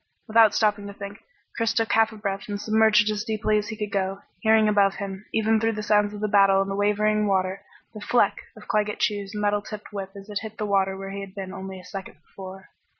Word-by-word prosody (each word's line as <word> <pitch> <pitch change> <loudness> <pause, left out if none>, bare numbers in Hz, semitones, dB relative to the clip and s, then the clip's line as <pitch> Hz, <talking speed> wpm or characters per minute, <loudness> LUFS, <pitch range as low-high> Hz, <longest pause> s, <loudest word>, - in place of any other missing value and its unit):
Without 220 -1 +5
stopping 210 -2 +1
to 200 - -9
think 200 0 -8 0.3
Chris 230 -1 0
took 225 -1 +1
half 225 0 +4
a - - -10
breath 195 -1 -4
and 205 0 -3
submerged 215 0 +4
as 210 0 -2
deeply 215 -1 +1
as 210 - -5
he 220 - -6
could 210 -2 -4
go, 195 0 -2 0.2
hearing 220 -1 +4
above 200 -2 +3
him, 195 0 -6
even 220 0 +2
through 225 +1 +1
the 215 0 -4
sounds 210 0 +3
of 210 0 -8
the 215 - +1
battle 195 -1 +5
and 195 0 0
the - - -2
wavering 210 +1 +2
water, 190 0 0 0.3
the 215 - -9
"fleck!" 240 +3 +2 0.2
of - - -13
Claggett 210 -1 0
Chew's 205 0 -1
metal 205 0 +1
tipped 210 0 -9
whip 195 -1 -5
as 195 0 -10
it 205 -1 -3
hit 220 0 -8
the 215 - -2
water 195 -1 +1
where 195 0 -6
he 200 0 -5
had 195 -1 -9
been 190 -1 -6
only 190 -1 -7
a 180 - -14
second 195 0 -8
before. 190 0 -11
205 Hz, 240 wpm, -25 LUFS, 195-215 Hz, 0.3 s, Without